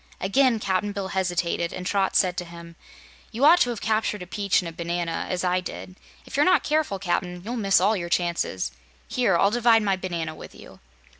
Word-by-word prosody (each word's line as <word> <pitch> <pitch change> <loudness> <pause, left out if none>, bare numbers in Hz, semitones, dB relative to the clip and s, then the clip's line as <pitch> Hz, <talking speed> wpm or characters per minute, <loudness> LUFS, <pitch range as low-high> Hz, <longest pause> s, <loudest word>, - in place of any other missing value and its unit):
Again 235 +4 +2
Cap'n 200 0 -1
Bill 195 -1 -4
hesitated, 175 -2 -1
and 185 0 -6
Trot 195 0 0
said 180 -3 +3
to 180 - -2
him: 170 0 -12 0.6
"You 240 +5 +1
ought 340 +4 +7
to 245 - +3
have 235 -4 -4
captured 215 -3 -1
a - - -9
peach 200 +1 0
and 180 - -4
a - - -5
banana, 170 0 -3
as 180 -1 -2
I 180 0 +1
did. 90 - -8 0.3
If - - -9
you're 285 - +4
not 365 - +4
careful, 300 -9 0
Cap'n, 180 -1 -2
you'll 235 +3 -4
miss 195 -4 +3
all 205 +4 +3
your 170 -3 -4
chances. 170 - -1 0.4
Here, 225 -9 +1
I'll 200 +4 +3
divide 230 -1 +4
my 195 -2 +1
banana 170 -4 -4
with - - -12
you." - - -14
190 Hz, 210 wpm, -24 LUFS, 175-215 Hz, 0.6 s, ought